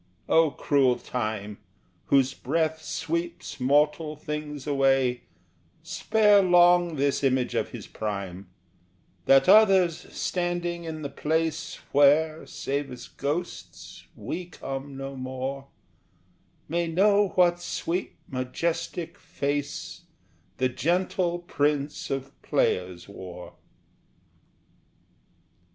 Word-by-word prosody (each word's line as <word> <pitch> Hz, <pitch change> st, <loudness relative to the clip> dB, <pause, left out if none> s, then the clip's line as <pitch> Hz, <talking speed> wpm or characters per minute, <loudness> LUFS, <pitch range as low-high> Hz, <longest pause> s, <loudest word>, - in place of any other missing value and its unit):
O 165 Hz, -1 st, +5 dB
cruel 135 Hz, -3 st, +2 dB
Time, 110 Hz, -5 st, -4 dB, 0.5 s
Whose 135 Hz, -1 st, +3 dB
breath 160 Hz, +4 st, -1 dB
sweeps 170 Hz, -1 st, -4 dB
mortal 150 Hz, +4 st, +2 dB
things 150 Hz, -2 st, -6 dB
away, 135 Hz, -3 st, +2 dB, 0.6 s
Spare 205 Hz, +4 st, +4 dB
long 175 Hz, -2 st, +5 dB
this 140 Hz, 0 st, 0 dB
image 130 Hz, -2 st, +1 dB
of -, -, -1 dB
his -, -, -8 dB
prime, 100 Hz, -3 st, -5 dB, 0.8 s
That 135 Hz, 0 st, +5 dB
others 190 Hz, -5 st, +5 dB
standing 175 Hz, -1 st, -2 dB
in 155 Hz, -1 st, -6 dB
the 140 Hz, -, -3 dB
place 160 Hz, +3 st, -1 dB, 0.2 s
Where, 155 Hz, +3 st, +4 dB
save 140 Hz, +1 st, -3 dB
as 125 Hz, -1 st, -9 dB
ghosts, 140 Hz, -, -5 dB
we 180 Hz, +2 st, -5 dB
come 135 Hz, -4 st, -7 dB
no 135 Hz, 0 st, -6 dB
more, 130 Hz, +1 st, -5 dB, 1.0 s
May 170 Hz, +2 st, -1 dB
know 200 Hz, +4 st, +3 dB
what 175 Hz, -1 st, +4 dB
sweet 175 Hz, +1 st, -3 dB
majestic 165 Hz, +6 st, -3 dB
face 145 Hz, +5 st, -4 dB, 0.5 s
The 130 Hz, 0 st, +1 dB
gentle 175 Hz, +5 st, 0 dB
Prince 145 Hz, -4 st, -1 dB
of 135 Hz, 0 st, -3 dB
Players 90 Hz, -1 st, 0 dB
wore! 90 Hz, -3 st, -10 dB
150 Hz, 100 wpm, -26 LUFS, 135-170 Hz, 1.0 s, O